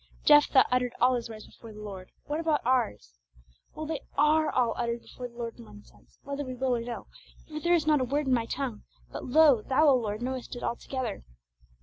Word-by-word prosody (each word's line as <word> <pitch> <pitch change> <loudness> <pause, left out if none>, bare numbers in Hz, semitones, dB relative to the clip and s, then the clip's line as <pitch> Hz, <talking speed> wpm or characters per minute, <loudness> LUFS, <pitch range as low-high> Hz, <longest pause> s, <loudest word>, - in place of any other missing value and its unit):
Jephthah 295 -2 +6
uttered 250 -1 +1
all 255 +1 +4
his 240 -2 -3
words 215 -1 -9
before 230 - -14
the 210 - -11
Lord; 195 -3 -8 0.2
what 295 +2 -2
about 315 -5 0
ours? 220 - -1 0.6
Well, 310 - -5
they 310 -2 -3 0.2
are 305 +2 +4
all 245 -2 +1
uttered 235 -1 -2
before 250 - -8
the 235 - -20
Lord 235 -1 -6
in - - -10
one 105 -1 -14
sense, - - -24
whether 280 +1 -4
we 255 -2 -6
will 255 0 0
or 235 - -2
no; 235 0 -6 0.4
for 305 -1 -6
there 345 +2 +3
is 325 - 0
not 305 -3 +3
a - - +1
word 285 +4 -1
in 260 - +2
my 230 -2 +1
tongue, 250 -5 -4 0.3
but - - -6
lo, 280 -3 +5
Thou, 270 +7 +3
O 275 - +6
Lord, 215 -2 -2
knowest 255 0 -4
it 245 - -8
altogether! 240 -2 -3
250 Hz, 225 wpm, -28 LUFS, 230-290 Hz, 0.6 s, Jephthah